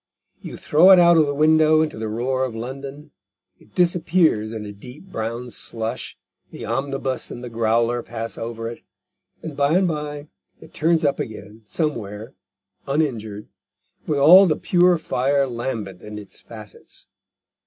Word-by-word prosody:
You - - -8
throw 165 +6 +4
it 190 - +9
out 170 -1 +6
of 155 -2 +4
the 145 - -2
window 155 +1 +4
into 150 -8 -5
the 110 - -3
roar 125 +4 -1
of 125 -3 -3
London, 135 +5 -8 0.5
it 105 - -23
disappears 170 -10 +2
in 110 -2 -6
a 105 - -7
deep 125 - -13
brown 115 +1 -4
slush, 115 +2 -4 0.3
the - - -8
omnibus 135 +2 -3
and 120 - -8
the 120 - -7
growler 115 +1 +1
pass 115 -1 -6
over 115 0 -5
it, 115 - -8 0.6
and 160 -3 -6
by 145 +4 +2
and 185 -1 +2
by 150 -2 -4 0.3
it - - -16
turns 160 0 +1
up 140 - +1
again 110 -1 -7
somewhere 110 - -4 0.5
uninjured, 115 -8 -2 0.6
with 150 - 0
all 180 +8 +8
the 155 - +1
pure 180 0 +3
fire 140 -2 0
lambent 115 -7 -5
in 105 0 -9
its 100 -2 -11
facets. 110 -4 -12
130 Hz, 155 wpm, -22 LUFS, 115-155 Hz, 0.6 s, it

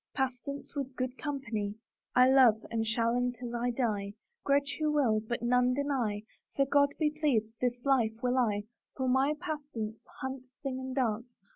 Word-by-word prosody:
Pastance, 265 +1 -3
with 270 -2 -3
good 255 0 -2
company 230 -9 -3 0.4
I 250 0 +7
love, 255 -5 +5
and 225 -1 0
shall 230 +1 +2
until 245 0 -1
1 240 0 -1
die; 205 -5 -1 0.3
Grudge 280 0 +2
who 305 -1 +2
will, 255 -8 +3
but 230 +2 -4
none 250 +1 +3
deny, 255 -8 -1 0.3
So 275 - +1
God 285 +1 +4
be 305 -2 +2
pleased, 265 -8 +1
this 245 0 -1
life 240 -5 +3
will 250 +1 +2
I, 210 -4 +1 0.3
For 260 -1 -1
my 265 +4 +3
pastance 260 -9 -5 0.2
Hunt, 265 0 -5
sing 260 -1 -3
and 260 0 -5
dance. 240 -1 -1
250 Hz, 165 wpm, -31 LUFS, 230-275 Hz, 0.4 s, I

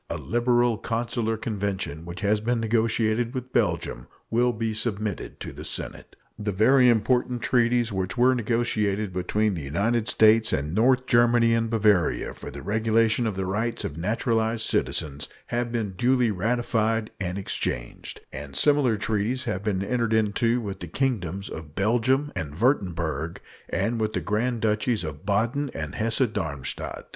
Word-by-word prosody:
A - - -2
liberal 120 -1 +1
consular 115 -1 -1
convention 100 -8 -3
which 85 +1 -7
has 105 +1 +2
been 120 +2 0
negotiated 115 +1 +1
with 130 0 -5
Belgium - - 0 0.2
will 120 +2 +3
be 115 -1 -2
submitted 110 -2 -3
to - - -6
the - - -8
Senate. - - -5 0.2
The 105 0 -1
very 125 +6 +5
important 120 +1 +1
treaties 120 -1 +2
which 95 +3 -3
were 125 +2 +5
negotiated 110 -4 0
between 105 +3 0
the 85 - -4
United 105 +11 0
States 110 0 +4
and 75 +3 -1
North 125 +5 +3
Germany 120 -2 +4
and 115 0 +1
Bavaria 105 -7 +2
for - - -9
the - - -9
regulation 110 +2 +2
of 105 - -2
the 95 0 -2
rights 110 +5 -2
of 70 - -4
naturalized 110 +5 0
citizens 75 -1 -1 0.2
have 120 0 0
been 115 -4 -2
duly 120 +4 +2
ratified 110 +1 0
and 90 -1 -3
exchanged, - - -4
and 70 0 -7
similar 145 -6 +3
treaties 110 +5 -1
have 105 -5 -3
been 100 -3 0
entered 115 -1 0
into 110 +2 +2
with 100 -3 -5
the 85 - -6
Kingdoms 100 - -2
of 80 -1 -9
Belgium 120 +8 +2
and 75 -5 -4
Wurtemberg 85 - 0 0.3
and 115 0 -1
with 110 0 -1
the - - 0
Grand 115 +3 -1
Duchies 110 +1 +1
of 75 +3 -7
Baden 120 +8 +1
and 75 -2 -4
Hesse 115 +4 0
Darmstadt. 80 - -4
110 Hz, 155 wpm, -25 LUFS, 100-120 Hz, 0.3 s, very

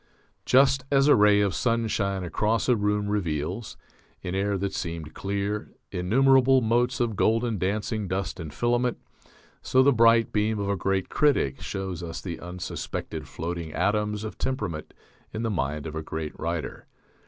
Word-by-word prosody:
Just 135 0 +5
as 140 0 +4
a 145 - +7
ray 105 -2 +5
of 100 -3 +1
sunshine 110 -5 0
across 105 +6 0
a 125 - +4
room 105 -1 0
reveals, 90 0 -2 0.5
in 90 - -4
air 100 +1 0
that 100 0 -2
seemed 85 -2 -5
clear, 100 +2 -3 0.2
innumerable 130 +8 +4
motes 120 +2 +1
of 120 -3 0
golden 115 +1 +1
dancing 105 +3 -1
dust 95 +1 -3
and 80 -3 -6
filament, 120 +7 0 0.6
so 130 0 +3
the 140 +1 +5
bright 115 0 +4
beam 105 +1 +1
of 100 -1 -2
a 100 - +1
great 95 +1 -1
critic 140 - +2
shows 95 -3 -4
us 85 -1 -5
the 90 -4 -6
unsuspected 90 0 -5
floating 85 -2 -5
atoms 105 +2 0
of 110 - -7
temperament 105 -12 -3 0.4
in 110 - -3
the 115 - 0
mind 75 -4 -2
of 80 - -5
a 80 - -3
great 80 0 -5
writer. 85 -3 -4
105 Hz, 160 wpm, -26 LUFS, 90-115 Hz, 0.6 s, a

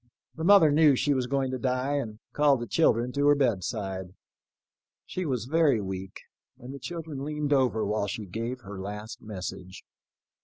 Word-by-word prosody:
The 160 - -6
mother 180 -4 +7
knew 150 -1 +5
she 145 +3 +1
was 130 -2 -1
going 135 0 0
to 130 - -3
die, 130 +3 0
and 110 -6 -4 0.2
called 145 -3 +4
the 120 - -4
children 120 -1 +2
to 140 +2 +1
her 145 - +6
bedside. 95 -6 -2 0.9
She 185 -2 -4
was 125 -5 -1
very 150 -3 +3
weak, 95 -1 -6 0.4
and 125 +2 -9
the 140 - -8
children 155 -1 -6
leaned 150 0 -1
over 125 -5 +2
while 105 0 -1
she 105 +3 -4
gave 115 +6 -4
her 100 -2 -8
last 105 +3 -7
message. 95 -3 -7
125 Hz, 170 wpm, -27 LUFS, 105-145 Hz, 0.9 s, mother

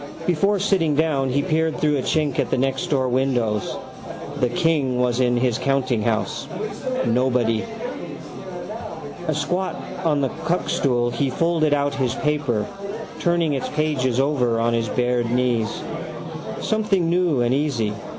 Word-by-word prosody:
Before 195 +4 +2
sitting 185 -6 +2
down 145 -3 +2
he 140 +2 +1
peered 160 +1 +1
through 150 -1 +2
a - - 0
chink 150 0 +1
up - - -1
at 130 - +1
the - - +1
nextdoor 135 +1 +1
windows. 125 -5 0 0.6
The 125 - +2
king 150 -5 +1
was 125 0 +2
in 120 -1 +3
his 120 -2 +1
countinghouse. 125 -5 0 0.6
Nobody. 120 -2 +2 1.6
Asquat 155 +5 0 0.3
on 150 -3 +2
the 135 - +1
cuckstool 130 -8 0
he 140 -2 +1
folded 160 0 +2
out 145 0 0
his 130 -3 0
paper, 145 -8 0 0.5
turning 170 -3 +2
its 135 - -2
pages 135 -5 0
over 130 -5 +2
on 115 +1 +2
his 115 -2 0
bared 125 0 +1
knees. 120 -3 +2 0.9
Something 210 -5 +1
new 170 -6 +2
and 120 +1 +2
easy. 130 -7 0
135 Hz, 135 wpm, -23 LUFS, 120-155 Hz, 1.6 s, in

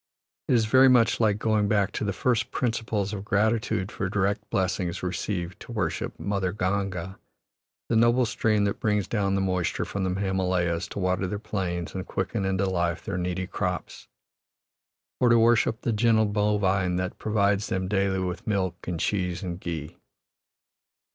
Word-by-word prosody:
It 130 - +3
is 115 -2 +3
very 130 +4 +6
much 120 -3 +4
like 105 -3 +3
going 110 -2 +1
back 100 -1 +2
to - - -3
the 105 - 0
first 115 +4 0
principles 110 -4 -1
of 100 -2 -4
gratitude 110 -1 0
for 95 - -3
direct 100 +1 -1
blessings 95 -2 -1
received 90 -1 -3
to - - -10
worship - - -2
"Mother 100 -2 -1
Ganga," 95 -2 -2 0.7
the 115 - 0
noble 120 +2 +4
stream 110 -1 +1
that 100 0 -1
brings 105 -2 +1
down 100 -3 0
the 95 - +1
moisture 90 -2 -1
from 100 - -3
the 95 0 -1
Himalayas 90 -3 0
to - - -9
water 95 0 0
their 105 - -3
plains 90 -5 -3
and 95 +1 -5
quicken 105 -4 -2
into 95 0 +1
life 85 -2 -1
their 95 -2 -2
needy 90 +1 -2
crops, - - -4 1.1
or 125 - +4
to 115 - +6
worship 115 -1 +3
the 115 - 0
gentle 110 0 +3
bovine 100 -3 +1
that 90 0 -3
provides 100 -1 +1
them 95 0 -2
daily 95 0 +1
with 90 -1 -4
milk 95 -4 -1
and 90 -2 -2
cheese 90 -1 -1
and 90 -1 -4
ghee. 80 -5 -6
100 Hz, 165 wpm, -26 LUFS, 90-105 Hz, 1.1 s, very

